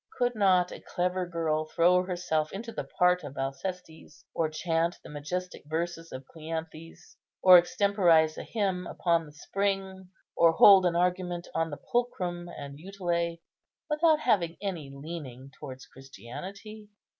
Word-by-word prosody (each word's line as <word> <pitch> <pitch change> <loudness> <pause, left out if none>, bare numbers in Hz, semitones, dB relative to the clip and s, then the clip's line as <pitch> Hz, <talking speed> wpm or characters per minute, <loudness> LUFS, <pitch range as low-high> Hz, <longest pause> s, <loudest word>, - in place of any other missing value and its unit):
Could 245 0 +1
not 185 -4 +3
a - - -8
clever 180 0 -2
girl 160 -2 -1
throw 175 +3 +3
herself 175 -4 -2
into 230 +4 -6
the 220 - -5
part 180 -1 +2
of 140 -1 -9
Alcestis, 160 +5 -6
or 160 -1 0
chant 165 +1 -1
the - - -11
majestic 180 +5 -5
verses 165 +1 -3
of 130 +1 -8
Cleanthes, 160 +1 -8 0.3
or 185 -1 +10
extemporize 175 -4 +3
a - - -6
hymn 195 -5 -2
upon 170 -2 0
the - - -13
spring, 190 +2 -3 0.3
or 165 -1 +5
hold 190 +1 +8
an 170 - -1
argument 180 0 -1
on 165 0 0
the 145 - -6
pulchrum 180 -8 -2
and 140 -3 -9
utile, 170 -2 -2 0.6
without 310 0 +3
having 175 - +1
any 175 -8 -4
leaning 140 -3 -8
towards 130 -3 -9
Christianity? 195 - -10
175 Hz, 145 wpm, -28 LUFS, 160-190 Hz, 0.6 s, or